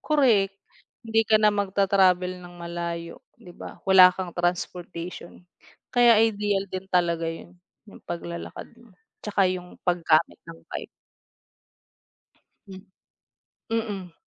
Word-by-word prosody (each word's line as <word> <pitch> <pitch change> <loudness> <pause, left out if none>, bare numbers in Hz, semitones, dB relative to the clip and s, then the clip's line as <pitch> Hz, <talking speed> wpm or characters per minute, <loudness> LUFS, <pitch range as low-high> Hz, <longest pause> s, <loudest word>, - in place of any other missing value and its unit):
Korek, 235 -10 +3 0.5
hindi 225 0 +2
ka 220 - +6
na 215 0 +4
magta-travel 190 -2 +2
ng 175 0 -12
malayo, 170 -1 -6 0.2
di 175 - -14
ba? - - -10
Wala 190 -1 +8
kang 185 -2 -5
transportation, 175 0 -4 0.5
kaya 240 -2 +6
ideal 205 -3 0
din 185 0 -5
talaga 170 -2 +1
yun 170 +2 -9 0.3
yung 205 - -15
paglalakad 170 0 -7 0.2
mo 235 - -20 0.3
tsaka 205 -2 0
yung 180 -1 -6
paggamit 165 -2 +2
ng 165 0 -10
bike. - - -6 1.8
Hmm. 190 -1 -10 0.9
Mm. 205 -6 -3
185 Hz, 115 wpm, -25 LUFS, 175-205 Hz, 1.8 s, Wala